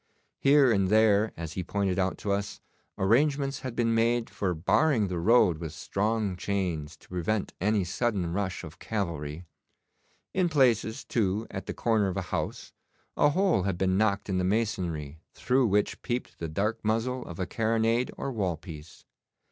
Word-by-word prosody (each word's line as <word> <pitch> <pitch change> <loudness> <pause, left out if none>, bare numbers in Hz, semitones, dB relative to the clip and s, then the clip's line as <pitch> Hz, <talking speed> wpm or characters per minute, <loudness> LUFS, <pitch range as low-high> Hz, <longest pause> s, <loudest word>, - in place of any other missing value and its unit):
Here 140 -2 +5
and 100 -3 +2
there, 110 0 +4
as 80 -1 -5
he 90 - -3
pointed 100 0 -1
out 95 0 0
to 100 - -1
us, 100 0 -2 0.4
arrangements 135 +7 +2
had 130 -3 -6
been 115 -1 +1
made 115 +1 +1
for 90 -3 -1
barring 110 - +2
the 90 -2 -2
road 95 -4 +4
with 80 -3 -6
strong 105 -1 -1
chains 85 -6 -3
to - - -21
prevent 90 +4 -2
any 105 0 +2
sudden 95 -2 -1
rush 95 -2 -2
of 85 +2 -10
cavalry. 85 -6 -4 0.9
In 185 -2 +2
places, 120 -7 +2
too, 105 -1 0
at 95 - -6
the - - -3
corner 110 -4 +2
of 95 - -3
a - - 0
house, - - -3 0.4
a 145 - +4
hole 185 - +2
had 95 -1 -1
been 95 0 +1
knocked 100 0 +1
in 95 -2 0
the - - 0
masonry 90 -8 -1 0.2
through 125 +1 +2
which 105 0 0
peeped 120 +1 -4
the 85 - -3
dark 105 +8 -1
muzzle 115 +4 0
of 85 - -8
a 95 - 0
carronade 115 +3 +1
or 135 - -3
wall 95 -8 -1
piece. 80 -2 -11
100 Hz, 170 wpm, -28 LUFS, 90-115 Hz, 0.9 s, Here